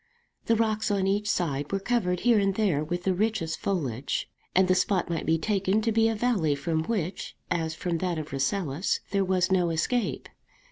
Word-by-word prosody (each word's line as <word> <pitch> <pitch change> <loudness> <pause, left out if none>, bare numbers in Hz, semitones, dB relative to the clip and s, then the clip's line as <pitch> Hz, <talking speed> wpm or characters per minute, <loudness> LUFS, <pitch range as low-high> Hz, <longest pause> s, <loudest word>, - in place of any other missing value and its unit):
The 230 - +4
rocks 220 -1 0
on 200 -2 +1
each 205 +2 0
side 145 -7 -1
were 195 - 0
covered 195 -5 0
here 235 -3 +4
and 195 -1 +1
there 190 -9 +1
with 175 +3 -3
the 190 - +2
richest 200 -4 -1
foliage; 140 - -2 0.3
and 185 0 +5
the 185 - +4
spot 185 -1 +1
might 165 - -2
be 165 0 +3
taken 195 +3 +1
to 225 - +1
be 225 +1 +3
a 225 - -1
valley 210 -10 +1
from 160 +3 -1
which, 185 -4 -3 0.2
as 160 -1 -1
from 170 0 -2
that 180 -2 -1
of 155 -2 -6
Rasselas, 140 +4 -1
there 200 0 +2
was 185 -1 +1
no 180 -2 +3
escape. 205 +9 -1
185 Hz, 195 wpm, -27 LUFS, 160-210 Hz, 0.3 s, and